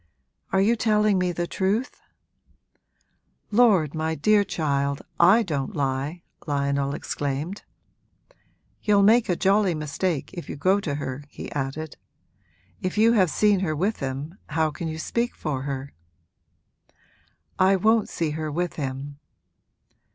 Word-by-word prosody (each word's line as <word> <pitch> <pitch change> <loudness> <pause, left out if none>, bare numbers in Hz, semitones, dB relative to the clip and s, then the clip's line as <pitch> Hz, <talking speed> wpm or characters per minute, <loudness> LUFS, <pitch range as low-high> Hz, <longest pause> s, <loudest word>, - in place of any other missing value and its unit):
'Are 190 - +3
you 220 +4 +3
telling 215 -3 +2
me 180 -1 +1
the 175 0 -2
truth?' 200 +7 -1 1.5
'Lord, 205 - +4
my 160 0 -1
dear 210 +3 +4
child, 140 -6 -1 0.2
I 195 +7 +6
don't 140 -8 -3
lie!' 140 +4 -2 0.2
Lionel 140 -1 0
exclaimed. 145 +7 -3 1.2
'You'll 205 -1 +4
make 225 +2 +5
a 180 - +2
jolly 195 -1 +2
mistake 155 +1 -2
if 175 -3 -8
you - - -4
go 185 +8 +2
to 155 -8 -3
her,' 140 0 -5
he - - -8
added. 145 +3 -4 0.8
'If 185 +2 -3
you 225 +2 +5
have 190 -6 +4
seen 205 +3 +3
her 165 -5 -1
with 195 +8 0
him 140 +7 -5
how 155 0 +1
can 165 +2 -5
you 160 0 -4
speak 235 +9 -2
for 145 -5 -3
her?' 135 0 -5 1.7
'I 190 +1 +5
won't 220 +3 +2
see 165 -3 -2
her 155 0 -3
with 175 +3 -2
him.' 140 0 -5
165 Hz, 135 wpm, -25 LUFS, 145-200 Hz, 1.7 s, I